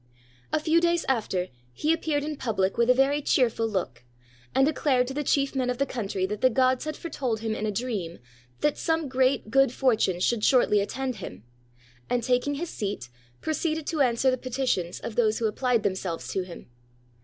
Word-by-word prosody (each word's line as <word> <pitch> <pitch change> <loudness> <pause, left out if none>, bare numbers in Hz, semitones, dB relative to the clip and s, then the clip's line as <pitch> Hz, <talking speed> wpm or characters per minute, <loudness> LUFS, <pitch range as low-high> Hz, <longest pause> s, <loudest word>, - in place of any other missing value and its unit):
A 310 - +2
few 325 +2 +3
days 340 0 +2
after, 200 -8 0 0.2
he 305 - +1
appeared 310 -3 -1
in 305 0 -3
public 210 -8 -1
with 235 +1 +2
a - - +8
very 275 +3 +3
cheer 255 -4 +3
ful 225 0 -1
look, 175 - -3 0.5
and 270 - +5
declared 275 -4 +2
to 265 - -5
the 295 +2 -2
chief 275 0 +1
men 255 -2 0
of 250 - -1
the 275 - +1
country 200 -7 -2
that 210 +2 -4
the 255 - +5
gods 255 +2 +2
had 310 -1 -4
foretold 255 -9 -3
him 225 -1 -1
in 215 0 -2
a - - 0
dream 200 -7 -3 0.4
that 295 - +1
some 325 -2 0
great 255 -3 +1
good 270 -1 +4
fortune 225 -9 +1
should 215 +3 +1
shortly 245 -5 +4
attend 255 +4 -3
him; 90 - -8 0.7
and, 245 -1 0
taking 250 +4 +1
his 335 +4 -4
seat, 200 - -4 0.3
proceeded 315 0 -1
to 310 -2 -1
answer 255 0 +3
the 255 - -2
petitions 245 -9 -1
of 230 - -5
those 220 -2 +2
who 230 - -1
appUed 240 0 0
themselves 190 -4 -2
to 190 - -1
him. 180 -2 -9
250 Hz, 200 wpm, -26 LUFS, 215-280 Hz, 0.7 s, a